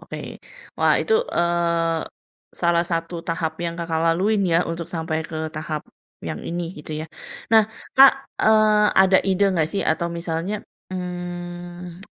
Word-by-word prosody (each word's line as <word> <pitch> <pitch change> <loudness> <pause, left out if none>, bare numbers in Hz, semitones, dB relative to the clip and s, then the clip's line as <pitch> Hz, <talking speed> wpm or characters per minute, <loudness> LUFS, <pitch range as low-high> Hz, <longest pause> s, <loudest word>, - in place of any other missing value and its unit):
Oke. - - -8 0.4
Wah - - +4
itu - - -1 0.2
eee, 170 -1 +1 0.6
salah 170 0 +3
satu 165 +1 -2
tahap 165 -1 -1
yang 170 0 -2
Kakak 165 -1 -1
laluin 190 +6 +2
ya 170 +1 +3
untuk 165 0 -5
sampai 160 -2 -2
ke 160 -1 -4
tahap 155 0 -4 0.4
yang - - -4
ini 170 0 -4
gitu 150 +1 -8
ya. - - -10 0.5
Nah 220 -1 +8 0.3
Kak, 270 0 +10 0.3
eee, 215 -1 +5
ada 190 0 +6
ide 195 +1 +2
enggak 160 -3 +1
sih 200 - 0
atau 170 +2 0
misalnya, 170 +4 -3 0.3
mmm, 175 -1 -6
170 Hz, 145 wpm, -23 LUFS, 165-185 Hz, 0.6 s, Kak